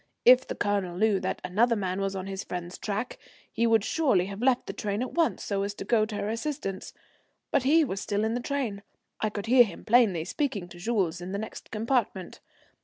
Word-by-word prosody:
If 255 +1 +7
the - - -4
Colonel 200 -4 -1
knew 210 -1 +3
that 185 - -3
another 230 +6 +2
man 190 -2 -2
was 195 0 -1
on 190 -1 -4
his 195 0 -5
friend's 175 0 -6
track, 215 +3 -3 0.3
he 230 - +1
would 225 -2 +4
surely 260 - +2
have 200 +2 -7
left 255 -1 +2
the - - -5
train 205 +3 -2
at 255 - -5
once 335 -1 +1
so 200 -1 -1
as 200 +1 -3
to - - -7
go 215 0 +3
to 215 - -6
her 205 - -2
assistance. 225 -4 -4 0.6
But - - +3
he 305 +5 +4
was 195 -6 -4
still 205 +1 -1
in 220 +1 0
the 245 - -1
train, 245 -7 -2 0.4
I 215 - 0
could 205 -1 -5
hear 245 +2 +7
him 195 -7 -8
plainly, 215 -8 +4
speaking 205 - -2
to 175 - -12
Jules 185 -5 0
in 180 +2 -6
the - - -1
next 220 +2 -7
compartment. 220 -5 -1
210 Hz, 220 wpm, -28 LUFS, 195-240 Hz, 0.6 s, If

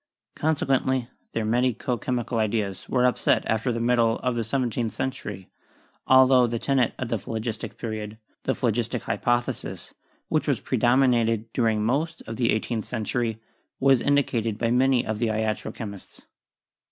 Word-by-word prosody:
Conse 155 -1 0
quently, 130 -2 +1 0.2
their 115 - -1
medico 125 +2 +1
chemical 120 0 -2
ideas 105 -3 -1
were 125 -1 +2
upset 125 - +2
after 110 +3 0
the 115 - -2
middle 115 -1 +2
of 125 -1 0
the 115 - 0
seventeenth 120 -2 -1
century, 105 -8 -4 0.6
altho 130 -1 +6
the 115 0 -2
tenet 130 0 +1
of 130 - -4
the 115 - 0
Phlogistic 110 +1 -5
Period 110 -1 -5
— - - -43
the 130 - +1
phlogistic 120 0 -1
hypothesis, 120 0 -2 0.3
which - - 0 0.2
predominated 120 -3 +2
during 110 -3 +1
most 155 +8 -1
of 110 0 -7
the 120 -2 +2
eighteenth 110 0 -1
century 115 -1 -2 0.2
— - - -48
was 135 -2 +4
indicated 120 -6 +1
by 115 0 0
many 130 0 +3
of 110 -1 -3
the 120 - +1
iatro 110 0 -1
chemists. 100 -4 -9
120 Hz, 155 wpm, -25 LUFS, 110-125 Hz, 0.6 s, altho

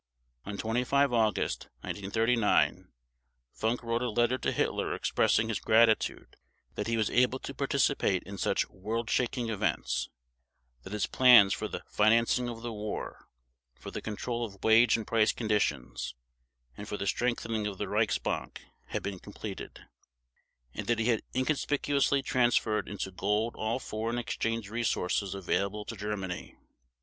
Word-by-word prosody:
On 100 0 -4
25 125 +5 +1
August 110 -3 +1
1939 110 +3 +1 0.6
Funk 115 +3 -1
wrote 115 0 -1
a 125 - 0
letter 120 +3 +1
to - - 0
Hitler - - -1
expressing 110 - +2
his 110 - -1
gratitude 110 0 +2 0.4
that - - -3
he 115 0 0
was 110 -2 +1
able 125 +1 +3
to 135 - -7
participate 135 -8 +1
in 100 0 -8
such - - +1
world 110 +4 -3
shaking 120 -1 0
events; 105 - -1 0.7
that 95 - -9
his 105 -2 0
plans 120 -6 +7
for - - -3
the - - -6
"financing 115 +3 +3
of 115 -1 -7
the 120 -1 -4
war", 105 0 -6 0.5
for - - -9
the - - -5
control 120 +3 -3
of 100 -4 -8
wage 115 +2 +6
and 110 - -5
price 115 -1 +3
conditions 100 - -1 0.6
and 105 - -8
for 105 - -4
the 100 - -3
strengthening 115 -1 -1
of 100 -2 -5
the - - -3
Reichsbank - - -1 0.2
had - - -4
been 100 -2 -4
completed; - - -8 0.9
and - - -5
that 120 - +2
he 115 +2 +1
had 115 -3 +2
inconspicuously 140 0 +1
transferred 120 -4 +1
into 100 -2 -4
gold 105 +5 0
all 110 +2 -1
foreign 115 -1 -3
exchange 115 -2 -2
resources 100 -3 -1
available 100 +2 -1
to 115 - -6
Germany. 100 -3 -5
115 Hz, 145 wpm, -30 LUFS, 105-120 Hz, 0.9 s, plans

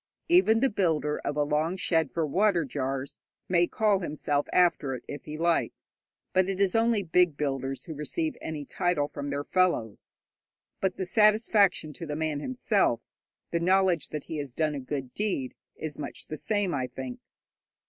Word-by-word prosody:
Even 330 -11 +5
the 270 - +4
builder 160 -7 0
of 145 - -3
a 150 - +3
long 155 +5 0
shed 160 -5 +1
for 165 +2 -1
water 180 +1 +2
jars 135 0 -3 0.3
may 175 -1 +3
call 210 -1 +2
himself 145 -4 -1
after 170 -7 +3
it 120 - -9
if 145 - -7
he 155 0 -6
likes, 170 0 -1 0.3
but 185 0 +3
it 195 -1 -2
is 195 -2 +3
only 225 -2 +2
big 175 -3 +3
builders 135 -2 -2
who 160 - -6
receive 310 - -2
any 150 -2 -5
title 175 -3 0
from 145 -1 -6
their 140 0 -2
fellows. 170 - 0 0.7
But 190 -1 -1
the 190 - -2
satisfaction 210 -5 +3
to 165 - -7
the 150 - -3
man 155 -2 -1
himself, 255 - +1 0.5
the 170 - +1
knowledge 185 -1 +2
that 150 -2 -5
he 160 - -5
has 140 -4 -5
done 155 -2 +1
a 145 - -3
good 130 -1 -5
deed, 195 -12 -2 0.2
is 155 -2 -6
much 145 - -5
the 155 - -6
same, 205 -2 0
I 130 -3 -1
think. 130 0 -7
160 Hz, 180 wpm, -28 LUFS, 145-190 Hz, 0.7 s, Even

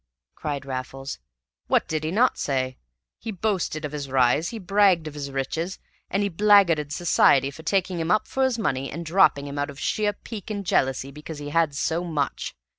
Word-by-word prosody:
cried 145 -3 -4
Raffles. 135 - -5 0.5
"What - - +2
did 155 -1 -2
he 155 - -1
not 230 +9 +2
say! 130 -2 -1 0.4
He - - -7
boasted 185 -6 -1
of 150 - -5
his 145 -2 -5
rise, 130 +5 +3
he 230 - -6
bragged 195 -4 +3
of 155 - -6
his 145 -1 -5
riches, 160 +7 -3 0.3
and 200 +1 0
he - - +2
blackguarded 175 -6 +4
society 140 -4 +3
for 150 - -11
taking 185 0 0
him 165 0 -2
up 215 +3 +2
for 265 - 0
his 260 -3 +1
money 135 - -1
and 170 +3 -6
dropping 160 -4 +4
him 140 0 -5
out 145 +1 -1
of 140 0 -10
sheer 210 -1 0
pique 210 0 -9
and 205 -2 -4
jealousy 135 -4 +1
because 150 +2 -8
he 145 0 -6
had 160 -3 +2
so 165 +4 0
much. 155 -6 -2
160 Hz, 195 wpm, -25 LUFS, 140-195 Hz, 0.5 s, blackguarded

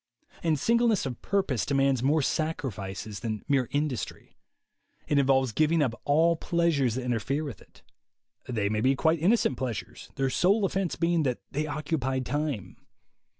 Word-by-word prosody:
And 160 -2 +1
singleness 230 - +2
of 125 -3 -5
purpose 190 - 0
demands 135 -3 +2
more 145 +3 +2
sac 155 +3 -1
rifices 100 -3 -5
than 110 -3 -4
mere 135 -4 +2
industry. 145 -4 -3 0.7
It 145 - +3
involves 135 -2 +3
giving 155 +5 +2
up 125 -5 0
all 165 +4 +4
pleasures 160 -8 +1
that 130 - -3
interfere 125 +5 -1
with 135 -10 -7
it. - - -21 0.7
They 110 -5 0
may 105 +1 0
be 130 +3 +3
quite 160 +4 +2
innocent 175 - +2
pleasures, 120 -5 -5
their 135 -1 0
sole 200 +7 +3
offense 190 -2 -1
being 170 0 +1
that 130 -5 0
they 150 +2 -2
occupy 145 -3 -2
time. 130 - -3
140 Hz, 155 wpm, -28 LUFS, 125-160 Hz, 0.7 s, all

